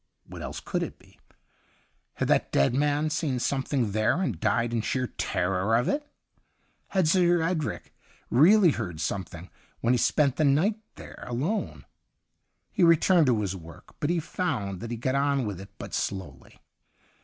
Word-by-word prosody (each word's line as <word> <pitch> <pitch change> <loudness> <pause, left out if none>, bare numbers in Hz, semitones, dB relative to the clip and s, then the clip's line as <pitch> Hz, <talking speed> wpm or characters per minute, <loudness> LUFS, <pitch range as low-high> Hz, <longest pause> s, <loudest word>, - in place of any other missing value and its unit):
What - - -10
else - - -5
could - - -3
it - - -5
be? - - -23 1.0
Had - - -1
that - - +2
dead 70 +10 +3
man 145 +3 +1
seen 155 -5 -1
something 130 -3 -1
there 110 - +1
and 125 - -2
died 120 +5 +1
in 115 - +1
sheer 130 +3 -1
terror 95 -1 -1
of 120 +2 +1
it 290 0 -2 0.4
.'' - - -43
Had 185 -4 +3
Sir 175 0 +3
Edric 165 -3 -3 0.4
really 175 - +6
heard 95 - -5
something 90 -2 -4 0.3
when 120 +2 +2
he 125 - +2
spent 140 +2 +2
that 155 - +2
night 170 +11 +2 0.2
there - - -11
alone 150 - -3 0.4
.'' - - -51
He - - -2
returned 170 -1 +5
to 115 -4 +2
his 95 -2 -2
work, 85 -2 -13
but 145 - -1
he 175 0 +1
found 110 - -3
that 115 - -6
he 120 - -4
got 130 +3 -1
on 140 -2 +1
with 100 -3 -5
it 100 - -11
but - - -8
slowly. 80 -10 -5
130 Hz, 175 wpm, -27 LUFS, 105-160 Hz, 1.0 s, really